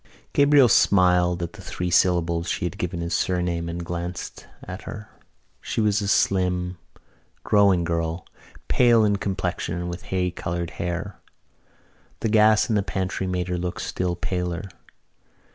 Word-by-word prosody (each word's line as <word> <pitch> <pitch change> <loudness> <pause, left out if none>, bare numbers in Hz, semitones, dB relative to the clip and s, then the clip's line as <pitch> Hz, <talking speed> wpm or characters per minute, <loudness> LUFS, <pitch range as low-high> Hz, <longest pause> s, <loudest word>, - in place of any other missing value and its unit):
Gabriel 145 -2 +6
smiled 90 -4 +3
at 85 - -5
the 105 - -11
three 90 -1 -4
syllables 85 -1 +2
she - - -1
had 100 +3 -5
given 90 -1 -3
his 85 0 -3
surname 90 -2 -1
and 85 0 -5
glanced 85 +1 -6 0.2
at 90 +1 -7
her. 105 -2 -8 0.5
She - - -3
was 105 -1 +2
a 100 - -2
slim, 90 -2 +1 0.6
growing 100 -4 +4
girl, 85 +1 -2 0.4
pale 120 -3 +4
in 100 -1 +2
complexion 95 -3 -3
and 90 0 -4
with 85 +1 -7
hay 90 -1 -1
coloured 85 -1 -4
hair. 90 +3 -4 1.0
The 115 - 0
gas 110 0 +5
in 115 - 0
the 105 - +3
pantry 95 0 -3
made 90 -1 -2
her 90 -1 -2
look 90 0 -4
still 90 -1 -2
paler. 90 0 -3
90 Hz, 150 wpm, -24 LUFS, 85-100 Hz, 1.0 s, Gabriel